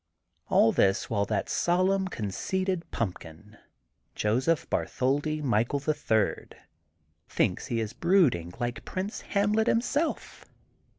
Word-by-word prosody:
AH 115 - +5
this 95 +4 +1
while 100 -2 +1
that 105 +2 -1
solemn 185 +6 +1
conceited 180 - -3
pump 100 -6 -2
kin 80 +7 -14 0.6
Josept 130 +9 +1
Bartholdi 145 +4 -1
Michael, 120 +2 +1
the 145 +2 0
Third, 110 -8 -1 0.7
thinks - - 0
he 115 - -1
is 110 -2 -3
brooding 160 - +2
like 120 0 -3
Prince 190 +2 -4
Hamlet 210 +2 +1
him 230 - +4
self. 290 +7 -2
140 Hz, 120 wpm, -28 LUFS, -, 0.7 s, AH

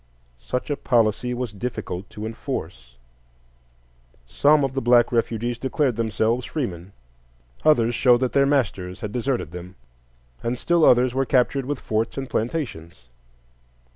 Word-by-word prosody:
Such 125 - -4
a 145 - -1
policy 120 0 +1
was 120 -3 -4
difficult 100 -4 -5
to 105 - -7
enforce; 90 - -6 1.3
some 145 - +3
of 135 -1 -1
the 135 - -1
black 120 -1 +4
refugees 120 0 -1
declared 135 -1 0
themselves 115 +2 0
freemen, 95 - -4 0.7
others 120 -6 +4
showed 120 +1 +4
that 130 - 0
their 140 0 +4
masters 105 -10 -1
had 105 - -4
deserted 125 - -2
them, 90 +1 -9 0.7
and 120 +1 -2
still 170 +5 +2
others 125 0 +5
were 135 +1 +1
captured 135 +1 +2
with 145 -2 -2
forts 110 +3 -2
and 135 -1 -3
plantations. 110 - -4
120 Hz, 140 wpm, -23 LUFS, 105-135 Hz, 1.3 s, others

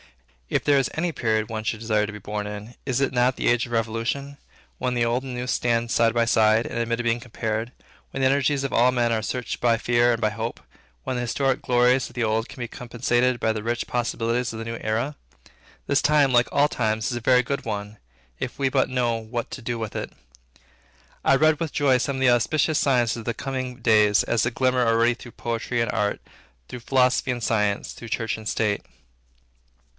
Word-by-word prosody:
If - - 0
there 145 -1 +5
is 135 - 0
any 170 +2 0
period 110 -4 0
one 110 0 -4
would 110 - -8
desire 110 -2 +1
to - - -6
be 105 - -8
born 105 +1 -4
in, 105 +3 -8
is 130 -2 0
it 140 -1 0
not 125 +1 +2
the - - -1
age 120 +1 +2
of - - -13
Revolution; 115 +5 -2 0.4
when 125 -1 -1
the 120 -1 +2
old 120 +2 0
and 130 -2 -6
the 125 - -3
new 125 - -4
stand 120 -2 0
side 115 -1 +3
by 120 -1 +2
side, 110 0 +3
and - - -5
admit 115 0 -1
of 120 - -3
being 120 0 +1
compared; 115 -1 -3 0.4
when - - -6
the 130 - +4
energies 140 +1 +1
of 135 - -3
all 125 +2 +4
men 120 -2 +1
are 110 - 0
searched 125 +3 -4
by 115 -1 +3
fear 120 +1 +3
and 115 - 0
by 110 -2 +1
hope; 115 +2 -4 0.4
when 130 - -3
the - - -1
historic 130 +2 0
glories 125 +1 +2
of 120 - -18
the 120 - 0
old, 110 +1 0
can 140 - -11
be 120 - -3
compensated 120 +1 0
by 110 - +1
the 110 - -4
rich 120 +1 -2
possibilities 120 0 -1
of 110 - -7
the 115 - -5
new 115 0 -4
era? 115 +7 -1 0.7
This 140 -1 +2
time, 145 -3 +3
like 120 0 +4
all 145 +1 +4
times, 110 -3 -1
is - - -2
a - - -5
very 125 +1 +4
good 140 +3 -3
one, 105 -1 -5 0.4
if 125 - -5
we 135 - +2
but 130 0 +1
know 125 -2 0
what 115 +1 -5
to - - -7
do 120 0 -3
with 110 -2 -5
it. - - -4 1.1
I 135 - +5
read 155 +1 +3
with 165 -3 -2
joy 140 -3 +3
some 140 +1 -1
of - - -4
the 130 - +5
auspicious 150 +6 +2
signs 125 -4 +2
of 115 - -7
the 120 +1 -3
coming 130 -2 -4
days, 110 -3 +4
as 115 -3 +1
they 120 - +2
glimmer 125 0 +1
already 115 +1 +3
through 120 0 -12
poetry 120 +1 -3
and 115 - 0
art, 100 +1 -1 0.5
through 125 - -8
philosophy 130 +2 +2
and 120 -2 -4
science, 105 -3 0
through 115 - -10
church 115 0 -1
and 110 -1 -5
state. 105 -2 0
120 Hz, 225 wpm, -24 LUFS, 115-130 Hz, 1.1 s, there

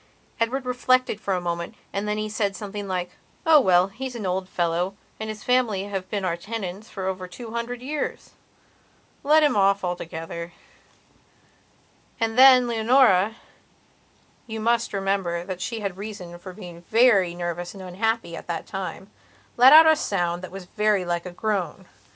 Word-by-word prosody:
Edward 250 +3 -1
reflected 250 -2 +1
for 195 - -1
a - - -1
moment 170 +4 -4 0.2
and 200 +1 -2
then 210 0 -1
he 215 0 -2
said 210 -2 -1
something 205 -1 -6
like: 180 -2 -3 0.3
"Oh 320 -2 +7
well, 185 -4 +4
he's 250 +5 -6
an 220 -4 -5
old 185 0 -2
fellow 175 +2 -1 0.2
and 220 0 -4
his 215 -1 -7
family 245 -6 +1
have 195 -2 -5
been 200 -3 -2
our 170 -2 0
tenants 200 +1 -6
for 190 -2 -6
over 185 -1 -3
two 225 +5 -9
hundred 235 +1 -4
years. 295 +2 -4 0.9
Let 305 +2 +5
him 295 - +3
off 200 0 +3
altogether." 170 -1 -5 1.7
And 225 -1 0
then 255 -1 +8
Leonorayou 225 -3 +3 1.1
must 225 +1 0
remember 195 -3 -1
that 185 -1 -6
she 230 +2 -4
had 195 -3 -4
reason 195 -4 -8
for 185 +1 -9
being 175 -3 -10
very 210 -7 +4
nervous 175 +1 -4
and 190 - -9
unhappy 200 0 -2
at - - -10
that 170 -2 -4
timelet 195 +6 0
out 320 +2 +10
a 315 0 +6
sound 175 - -1
that 185 - -7
was 195 -1 -9
very 210 -1 +1
like 175 +1 -2
a - - -7
groan. 190 -2 -3
200 Hz, 165 wpm, -24 LUFS, 180-230 Hz, 1.7 s, out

